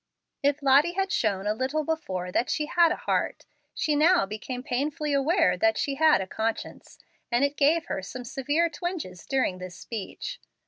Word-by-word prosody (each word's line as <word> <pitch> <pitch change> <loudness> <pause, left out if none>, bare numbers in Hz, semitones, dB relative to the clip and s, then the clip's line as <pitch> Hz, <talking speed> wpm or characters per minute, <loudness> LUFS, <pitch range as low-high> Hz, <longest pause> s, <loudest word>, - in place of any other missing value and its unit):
If 285 +1 +1
Lottie 280 +5 +5
had 385 0 -1
shown 200 - 0
a 210 - +1
little 265 +7 -1
before 190 - -3
that 240 - 0
she 305 - 0
had 335 +1 +4
a - - +1
heart, - - -1 0.3
she 305 -1 0
now 330 - +4
became 220 +5 -6
painfully 285 +3 -1
aware 285 +6 +3
that 330 0 +2
she 280 - -1
had 305 -5 +4
a - - -3
conscience, 220 +4 -4 0.3
and 240 +3 +2
it 285 +1 -2
gave 315 +4 +3
her - - -3
some 245 +6 -7
severe 290 +7 0
twinges 335 - -5
during 260 -9 0
this 185 -1 -8
speech. 240 - -6
280 Hz, 180 wpm, -27 LUFS, 225-315 Hz, 0.3 s, Lottie